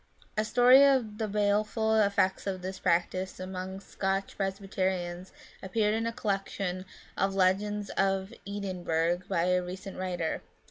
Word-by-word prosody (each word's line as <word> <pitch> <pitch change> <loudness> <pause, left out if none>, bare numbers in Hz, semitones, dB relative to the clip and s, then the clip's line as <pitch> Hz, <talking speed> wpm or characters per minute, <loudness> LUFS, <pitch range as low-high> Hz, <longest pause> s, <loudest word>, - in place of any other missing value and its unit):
A 215 - +2
story 250 +4 +7
of 250 -6 +3
the 220 - 0
baleful 210 +2 +1
effects 200 -2 +2
of 185 -2 -3
this 190 0 -5
practice 185 +1 0
among 185 +1 -5
Scotch 195 0 -2
Presbyterians 190 -2 -2 0.3
appeared 210 +2 +1
in 225 +1 0
a - - -1
collection 195 -4 -2 0.3
of 195 +1 0
Legends 200 +2 +1
of 195 +2 0
Edinburgh 175 -4 -1
by 170 - +1
a 180 0 +2
recent 185 +2 -7
writer. 180 -3 -2
195 Hz, 135 wpm, -29 LUFS, 185-210 Hz, 0.3 s, story